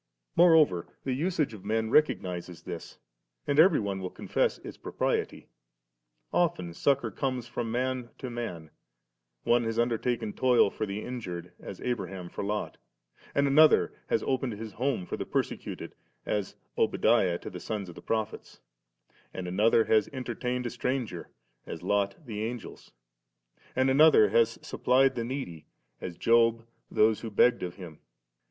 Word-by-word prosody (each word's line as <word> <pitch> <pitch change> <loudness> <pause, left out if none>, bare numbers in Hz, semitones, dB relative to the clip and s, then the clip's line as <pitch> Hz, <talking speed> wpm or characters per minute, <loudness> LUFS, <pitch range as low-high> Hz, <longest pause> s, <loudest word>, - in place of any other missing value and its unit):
Moreover 160 - +5 0.2
the 130 - -1
usage 155 -2 0
of 105 - -10
men 110 0 -1
recognises 90 - +1
this, - - -8 0.5
and 145 +1 +1
every 180 +5 +7
one 100 -2 -2
will 95 -1 -4
confess - - -1
its - - -9
propriety. - - -2 0.9
Often 160 - +1
succour 140 +9 +1
comes 130 -3 -2
from 120 -1 -4
man 125 0 -1
to 130 - -6
man; 90 -10 -6 0.7
one 120 0 +3
has 115 0 -2
undertaken 120 -2 0
toil 125 -6 +4
for 110 - -3
the 100 +2 -4
injured, 90 -8 -6
as 95 - -9
Abraham 95 -7 -3
for - - -5
Lot; 105 +1 -3 0.6
and 140 - +3
another 150 +3 +5
has - - +1
opened 130 -2 -1
his 110 +1 -7
home 125 -5 -1
to - - -4
the - - -3
persecuted, - - -3 0.3
as 105 -3 -2 0.2
Obadiah 90 -2 +3
to - - -9
the 90 - -7
sons 105 +1 -4
of 85 - -9
the - - -12
prophets; 110 -2 -3 0.8
and 90 -1 -4
another 110 +5 +3
has 110 -2 +3
entertained 125 -1 -3
a 120 - -2
stranger, 125 -7 -3 0.4
as - - -7
Lot 100 - 0
the 110 -3 -4
Angels; 120 +1 -6 0.9
and 130 +1 +3
another 140 -4 +6
has 115 -1 +3
supplied 135 +1 +3
the 120 - -3
needy, 115 - -5 0.3
as 85 -2 -6
Job 115 0 +3 0.2
those 110 0 +3
who 115 - -5
begged 120 +3 +4
of 90 -1 -4
him. 85 -5 -10
115 Hz, 150 wpm, -29 LUFS, 100-130 Hz, 0.9 s, every